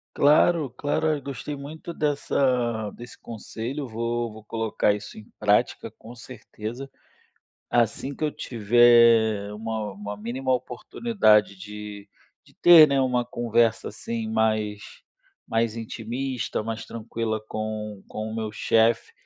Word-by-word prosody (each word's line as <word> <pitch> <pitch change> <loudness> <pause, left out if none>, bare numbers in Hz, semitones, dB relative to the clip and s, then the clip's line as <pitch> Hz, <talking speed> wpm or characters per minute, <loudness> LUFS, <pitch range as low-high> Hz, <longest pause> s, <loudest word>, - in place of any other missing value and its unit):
Claro, 150 +1 +4
claro. 145 +5 -1
Eu 155 -2 0
gostei 140 +2 -6
muito 155 +4 -8
dessa 125 -7 0
desse 120 0 -12
conselho. 120 +5 -6
Vou 115 0 -2
vou 110 0 -12
colocar 110 -1 0
isso 105 0 -8
em 110 - -9 0.2
prática, 105 0 +1
com 115 - -14
certeza. 120 +2 -8 0.8
Assim 120 +4 0
que - - -11
eu 155 - +1
tiver 115 -3 +4
uma 110 -1 -4
uma 105 +1 -7
mínima 125 +5 -2
oportunidade 125 - +1
de 105 0 -9 0.4
de - - -22
ter, 170 -3 +9
né, 140 -2 +1
uma 125 -2 +1
conversa, 120 -1 +1
assim, 115 +1 -5
mais 110 -2 0 0.7
mais 115 0 0
intimista, 120 +2 -4
mais 115 0 -5
tranquila 115 -1 -4
com 110 -1 -5
com 110 0 -5
o 110 - -5
meu 110 -1 -3
chefe, 115 - +2
115 Hz, 130 wpm, -25 LUFS, 110-130 Hz, 0.8 s, ter